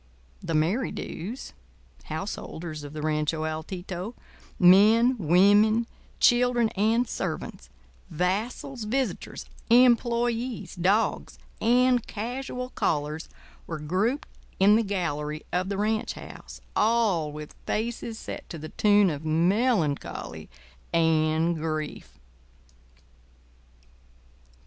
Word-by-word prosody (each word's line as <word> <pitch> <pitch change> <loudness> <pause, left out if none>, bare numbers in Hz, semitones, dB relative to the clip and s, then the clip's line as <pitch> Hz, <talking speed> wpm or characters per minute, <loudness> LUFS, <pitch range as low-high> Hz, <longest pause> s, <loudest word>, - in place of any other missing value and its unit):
The 170 -3 -4
Merrydews 195 +5 -2 0.5
(householders 160 -2 -5
of 145 0 -8
the 155 -1 -5
Rancho 155 0 0
Altito), 175 +6 -5 0.4
men, 215 +7 +6
women, 205 +6 +4 0.3
children, 245 -1 +4
and 225 +5 +1
servants, 160 - -5 0.4
vassals, 215 - -2
visitors, 260 +4 -2 0.2
employés, 240 -3 +2
dogs, 200 +5 +1 0.2
and 245 +1 +4
casual 250 +3 -5
callers 150 +1 -2 0.4
were 160 - -4
grouped 190 - -1 0.3
in 200 +2 +6
the 225 - +4
"gallery" 155 -7 -3
of 180 +2 0
the 200 - -2
ranch 215 +2 0
house, - - -11
all 210 -9 +2
with 150 0 -8
faces 230 0 -2
set - - -8
to 170 - -6
the 155 0 -8
tune 205 -3 +4
of 145 0 -5
melancholy 165 - 0 0.4
and 160 0 +2
grief. 155 - -4
195 Hz, 95 wpm, -26 LUFS, 160-230 Hz, 0.5 s, men